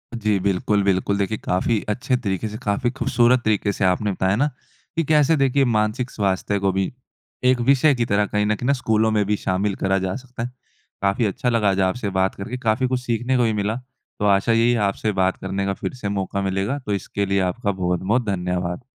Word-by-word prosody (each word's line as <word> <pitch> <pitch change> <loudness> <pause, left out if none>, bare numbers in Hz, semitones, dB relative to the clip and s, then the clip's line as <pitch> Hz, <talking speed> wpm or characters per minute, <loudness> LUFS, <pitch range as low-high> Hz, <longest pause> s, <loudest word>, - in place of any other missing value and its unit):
जी 105 -3 +1
बिल्कुल, 100 +2 +1
बिल्कुल। 100 +1 +1
देखिए, 100 +2 -1
काफ़ी 100 +4 0
अच्छे 125 +4 0
तरीके 100 -3 -2
से 105 - -6
काफ़ी 105 +4 0
ख़ूबसूरत 125 -1 +2
तरीके 105 -1 +1
से 95 - 0
आपने 100 +3 +1
बताया 95 +1 +1
ना 145 +6 +2 0.5
कि 165 - +1
कैसे 155 +1 +4
देखिए 135 0 +3
मानसिक 115 +2 0
स्वास्थ्य 100 0 -1
को 100 0 +1
भी 95 0 -1 0.5
एक 125 0 +4
विषय 140 +4 +4
की 120 -1 0
तरह 105 -2 +2
कहीं 105 0 0
न 105 +1 +1
कहीं 120 - -4
ना 140 - +4
स्कूलों 110 -4 +1
में 105 -1 +2
भी 105 +1 +1
शामिल 95 +2 -1
करा 95 0 +2
जा 95 - -2
सकता 125 -2 -7
है। 120 - -3 0.5
काफ़ी 100 +4 +1
अच्छा 105 +5 -1
लगा 115 -4 +2
आज 95 0 0
आपसे 105 +1 -3
बात 95 0 0
करके 115 +6 -5
काफ़ी 125 +1 +1
कुछ 125 0 -1
सीखने 120 +1 0
को 125 - +3
भी 110 -1 +1
मिला। 105 +1 -1 0.4
तो 105 - 0
आशा 100 +2 +3
यही 115 +1 +4
है 120 - +1
आपसे 105 +1 0
बात 95 -1 +1
करने 95 0 -2
का 100 - 0
फ़िर - - -5
से 125 -6 -5
मौका 100 0 -2
मिलेगा। 95 +8 -1
तो 105 - -1
इसके 100 +1 -2
लिए 100 0 +1
आपका 95 +3 0
बहुत-बहुत 95 +5 0
धन्यवाद! 90 -1 -2
105 Hz, 220 wpm, -22 LUFS, 95-120 Hz, 0.5 s, कैसे